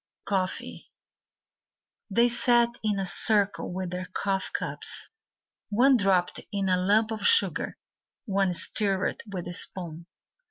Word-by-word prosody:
Coffee 190 -2 -3 1.2
They 235 +4 +4
sat 240 0 +2
in 210 -2 0
a 195 - -1
circle 200 +2 +1
with 185 -1 -4
their 180 0 -4
coffee 195 -1 -1
cups. - - -3 0.6
One 255 +6 +5
dropped 195 -5 +2
in 200 -2 -1
a 185 - +3
lump 215 +4 +3
of 220 - -4
sugar, 460 0 +3 0.5
One 195 -4 +1
stirred 195 +1 0
with 180 -3 -5
a 175 - -5
spoon. 170 -2 -7
195 Hz, 125 wpm, -27 LUFS, 185-220 Hz, 1.2 s, One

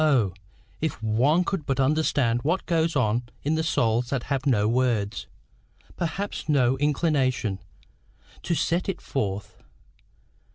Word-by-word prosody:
if 160 -2 -2
one 130 +11 +3
could 185 -3 -2
but 135 -1 0
understand 135 -4 +2
what 170 +8 0
goes 165 -2 +1
on 120 -3 +2 0.2
in 150 - +1
the 160 - +1
souls 120 -7 +1
that 130 -3 -1
have 135 +1 -1
no 105 -6 +3
words, 115 -4 0 0.7
perhaps 175 +1 -3
no 130 -3 +3
inclination, 135 - +1 0.8
to 170 - -1
set 175 +4 0
it 190 - -2
forth! 100 -6 -4
135 Hz, 125 wpm, -25 LUFS, 120-160 Hz, 0.8 s, one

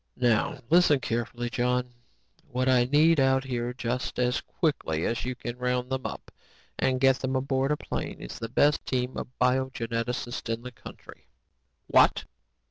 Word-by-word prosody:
"Now 125 +5 +2
listen 170 -5 +5
carefully, 120 0 -3
John. 125 0 0 0.6
What 130 +1 -1
I 125 -2 +4
need 150 +4 +4
out 135 0 +3
here 120 -2 -2
just 125 0 -3
as 125 +1 +1
quickly 115 - -1
as 115 - -1
you 130 0 -3
can 120 0 -6
round 125 0 -1
them 130 -1 -1
up - - -9 0.5
and 130 -1 +1
get 135 0 +4
them 130 0 -2
aboard 135 +1 0
a 150 - +1
plane - - -5
is - - -8
the 115 - -5
best 145 +5 +3
team 125 0 -1
of - - -4
biogeneticists 120 -2 -1
in 115 +1 -3
the 125 - -7
country. - - -13 0.6
"What? - - +4
125 Hz, 160 wpm, -27 LUFS, 120-130 Hz, 0.6 s, listen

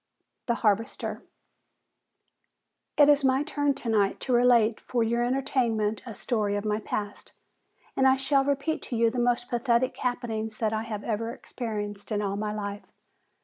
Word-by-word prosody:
"The 235 - +2
Harvester." 210 +2 0 1.8
"It 290 - +7
is 290 -1 +5
my 265 +1 +3
turn 290 -2 0
tonight 215 -6 0
to 255 - -1
relate 240 -2 +4
for 240 -2 -1
your 235 +1 +1
entertainment 240 -5 0
a 225 - -7
story 210 -2 -1
of 205 +1 -3
my 210 0 0
past, 205 -1 -5 0.6
and 265 - +4
I 265 - +6
shall 270 +1 +2
repeat 285 +3 -1
to 245 - -2
you 230 0 +3
the 245 - -3
most 240 0 +1
pathetic 240 +1 +1
happening 240 -3 -2
that 220 -1 0
I 220 - 0
have 220 -2 -5
ever 225 0 -2
experienced 210 -4 -6
in 210 - +1
all 200 -1 -1
my 210 +1 -2
life. 205 -1 -5
235 Hz, 160 wpm, -27 LUFS, 215-255 Hz, 1.8 s, It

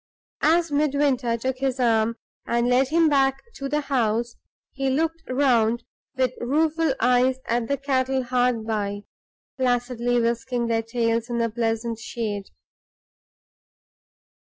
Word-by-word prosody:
As 330 +1 +3
Midwinter 280 -5 +1
took 260 +2 -3
his 265 -1 -1
arm, 230 -2 +2 0.3
and 235 0 +1
led 250 +2 +3
him 325 +3 +3
back 270 -2 +2
to 275 0 -5
the 300 +2 0
house, 235 -4 0 0.4
he 270 -1 -2
looked 325 +4 0
round 240 -3 +2 0.3
with 260 -2 +1
rueful 310 +3 +1
eyes 250 +1 +3
at 235 0 0
the 280 - 0
cattle 265 -1 0
hard 245 -2 +1
by, 205 -2 -2 0.6
placidly 245 -1 +1
whisking 235 +1 -1
their 230 -1 +1
tails 230 0 -1
in 240 - -2
the 230 -1 0
pleasant 225 0 -2
shade. 215 -3 -4
245 Hz, 130 wpm, -24 LUFS, 230-270 Hz, 0.6 s, As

